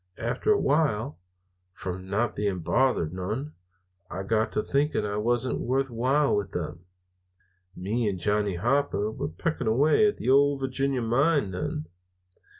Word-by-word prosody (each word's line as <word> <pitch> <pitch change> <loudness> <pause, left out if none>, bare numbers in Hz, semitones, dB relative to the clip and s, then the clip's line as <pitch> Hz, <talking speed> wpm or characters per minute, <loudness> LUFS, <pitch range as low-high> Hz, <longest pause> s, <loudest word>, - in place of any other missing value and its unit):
After 120 - 0
a 210 - +5
while, 140 - +1 0.6
from 95 0 -6
not 110 +3 0
being 100 -3 -1
bothered 85 -2 +1
none, 110 +11 -4 0.6
I 95 - -4
got 110 +2 +1
to 105 - 0
thinking 140 -5 0
I 105 0 -2
wasn't 120 +4 0
worth 135 +1 0
while 135 +5 +2
with 100 -3 -2
them. 85 +1 -5 0.9
"Me 105 +4 -1
and 95 - -3
Johnny 105 0 0
Hooper 110 0 0
were 140 +5 -4
pecking 155 -5 -3
away 145 - +4
at 205 - -1
the - - -6
Ole 140 +2 +5
Virginia 135 -1 -1
mine 135 - +2
then. 90 -4 -3
120 Hz, 150 wpm, -27 LUFS, 100-140 Hz, 0.9 s, a